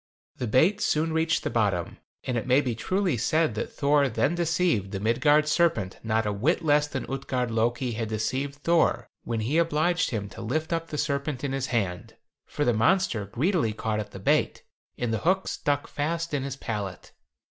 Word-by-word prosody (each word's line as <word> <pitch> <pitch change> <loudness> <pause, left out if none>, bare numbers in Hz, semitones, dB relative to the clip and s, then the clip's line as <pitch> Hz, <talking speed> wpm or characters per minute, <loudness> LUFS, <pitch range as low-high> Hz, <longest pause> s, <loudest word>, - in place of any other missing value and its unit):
The 125 - -3
bait 170 - +3
soon 160 -5 +1
reached 160 0 +1
the - - -2
bottom, 100 -7 0 0.2
and 125 - -2
it 115 +1 -2
may 130 +2 +5
be 130 -4 -1
truly 185 - 0
said 155 +4 +1
that 110 - -4
Thor 140 -1 +2
then 140 +7 +1
deceived 165 - +1
the 95 -1 -4
Midgard 145 +8 +3
serpent 150 - +1
not 110 0 0
a 105 - 0
whit 155 - 0
less 150 0 +4
than 135 -3 -4
Utgard 130 -3 -2
Loki 120 +3 0
had 110 -1 -3
deceived 130 +6 -2
Thor 165 +3 +1
when 115 -2 -2
he 140 +10 +1
obliged 170 +2 +1
him 105 -4 -3
to 115 - -10
lift 155 +9 -2
up 165 0 -2
the 150 - -5
serpent 140 -2 -2
in 140 - -1
his 135 -1 -2
hand: 95 -7 -2 0.3
for 145 - -2
the 120 - +3
monster 110 - +2
greedily 130 - 0
caught 110 0 -2
at 105 -1 -5
the 100 - -10
bait, 95 - +1 0.3
and 120 -2 -1
the 110 - 0
hook 190 +2 +1
stuck 145 0 -1
fast 165 +2 -2
in 145 - 0
his 135 0 -4
palate. 105 -8 -5
135 Hz, 195 wpm, -26 LUFS, 110-160 Hz, 0.3 s, may